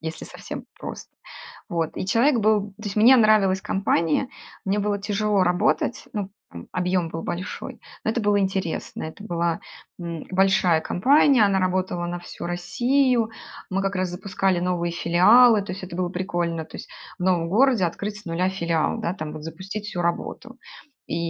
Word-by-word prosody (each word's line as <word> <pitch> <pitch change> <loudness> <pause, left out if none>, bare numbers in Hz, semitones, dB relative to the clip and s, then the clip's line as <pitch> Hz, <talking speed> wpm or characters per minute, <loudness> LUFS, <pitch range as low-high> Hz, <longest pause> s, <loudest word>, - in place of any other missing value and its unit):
если 160 0 -6
совсем - - -8
прос - - -7 0.6
Вот. 165 -2 -2
И - - -3
человек 235 +5 +3
был 210 -1 +2
то 215 - -13
есть, 205 0 -4
мне 235 +5 +7
нравилась 210 -5 +4
компания, 190 - +1 0.4
мне 200 +2 0
было 205 0 -1
тяжело 205 -1 +1
работать, 180 +6 +1
ну, 200 -3 -3 0.2
там, 85 0 -10
объем 180 -1 0
был 165 0 -5
большой. 185 +4 -5 0.2
Но - - +1
это 235 - -1
было 205 -1 +2
интересно, 190 -3 -2
это 160 +6 -8
была, 170 -4 -1 0.4
м, 170 -2 -6
большая 185 -3 +3
компания, 270 +3 +4
она 200 -1 +2
работала 185 -1 -1
на 175 0 -4
всю - - -9
Россию. 240 +6 +1 0.4
Мы 195 +1 0
как 195 +1 -1
раз 185 -1 -1
запускали 190 0 -1
новые 175 -1 -1
филиалы, 205 +7 +5
то 195 - -6
есть 185 +1 -7
это 170 -2 -8
было 180 -1 0
прикольно, 175 -3 -2
то - - -10
есть, - - -9 0.3
в - - -6
новом 175 -3 +2
городе 235 0 +3
открыть 205 +5 -3
с - - -21
нуля 175 +2 0
филиал, 170 -4 0
да, 175 - -2
там 155 -5 -6
вот, 155 -1 -8
запустить 190 +6 -6
всю 180 -4 -3
работу. 170 0 -3 0.5
И - - -2
185 Hz, 175 wpm, -24 LUFS, 175-210 Hz, 0.6 s, мне